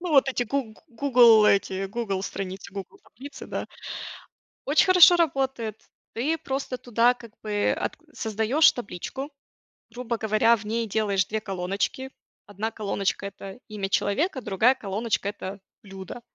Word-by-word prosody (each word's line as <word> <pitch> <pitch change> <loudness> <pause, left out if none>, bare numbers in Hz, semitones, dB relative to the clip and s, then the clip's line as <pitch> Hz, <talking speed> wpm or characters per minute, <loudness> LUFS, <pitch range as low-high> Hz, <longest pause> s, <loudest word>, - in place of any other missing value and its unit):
ну, 355 -1 -4
вот 275 -3 +5
эти 255 -2 0
гу 240 -2 -3
"Гугл" 235 -4 +6
эти 195 -1 +2
"Гугл" 200 -2 -3
страницы, 195 0 -6
"Гугл" 195 -1 -8
таблицы, 275 +5 -11
да. - - -4 1.0
Очень 290 +3 +4
хорошо 360 -1 +8
работает. 265 -9 -1 0.3
Ты 285 +8 0
просто 270 -3 -4
туда 240 +1 +3
как 235 -3 -14
бы 210 -1 0
ат - - -3 0.2
создаешь 225 +8 +3
табличку, 245 - -6 0.6
грубо 240 -1 -3
говоря, 220 +1 +3
в 210 -2 -9
ней 225 +2 -1
делаешь 200 -3 +1
2 220 +1 -3
колоночки. 195 +7 -3 0.4
1 205 +3 -4
колоночка- 200 -2 -2
это 195 +2 -10
имя 205 -3 -4
человека, 260 - 0
другая 220 +5 +3
колоночка- 210 -2 -2
это 200 -1 -7 0.2
блюдо. 195 +3 -9
220 Hz, 140 wpm, -25 LUFS, 200-255 Hz, 1.0 s, хорошо